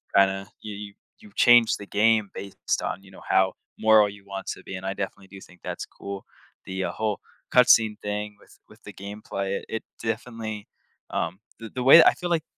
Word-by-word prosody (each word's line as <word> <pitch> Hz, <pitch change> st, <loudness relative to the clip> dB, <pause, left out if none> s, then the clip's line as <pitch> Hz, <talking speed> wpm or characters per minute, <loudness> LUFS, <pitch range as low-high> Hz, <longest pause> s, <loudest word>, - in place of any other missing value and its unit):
kinda, 95 Hz, 0 st, +3 dB
you 105 Hz, -2 st, -7 dB
you 100 Hz, -1 st, -8 dB, 0.3 s
you've 210 Hz, -2 st, -17 dB
changed 120 Hz, -3 st, +6 dB
the 100 Hz, -, -9 dB
game 110 Hz, -1 st, +3 dB
based 100 Hz, -1 st, -3 dB
on, 95 Hz, -, -3 dB
you 95 Hz, -, -16 dB
know, 95 Hz, -, -14 dB
how 95 Hz, -1 st, +3 dB, 0.3 s
moral 110 Hz, -1 st, +6 dB
you 100 Hz, 0 st, -10 dB
want 100 Hz, -1 st, -7 dB
to -, -, -13 dB
be, 95 Hz, -, -7 dB
and 95 Hz, +1 st, -7 dB
I 95 Hz, -, -1 dB
definitely 95 Hz, 0 st, -6 dB
do 95 Hz, 0 st, -11 dB
think 90 Hz, -1 st, -17 dB
that's -, -, -5 dB
cool. 100 Hz, -1 st, -8 dB, 0.4 s
The 95 Hz, 0 st, -3 dB
whole 105 Hz, +1 st, -2 dB, 0.3 s
cut 125 Hz, -1 st, +6 dB
scene 110 Hz, -2 st, +5 dB
thing 105 Hz, 0 st, -3 dB
with -, -, -21 dB
with -, -, -19 dB
the -, -, -10 dB
gameplay, 100 Hz, -1 st, -4 dB
it -, -, -14 dB
it 110 Hz, -, -4 dB, 0.2 s
definitely 110 Hz, -2 st, -4 dB, 0.4 s
um, 90 Hz, +4 st, -2 dB, 0.2 s
the 115 Hz, -1 st, -8 dB
the 125 Hz, -, -3 dB
way 160 Hz, +5 st, +10 dB
I -, -, +6 dB
feel 175 Hz, -1 st, -5 dB
like, 165 Hz, -2 st, +1 dB
105 Hz, 205 wpm, -25 LUFS, 95-110 Hz, 0.4 s, way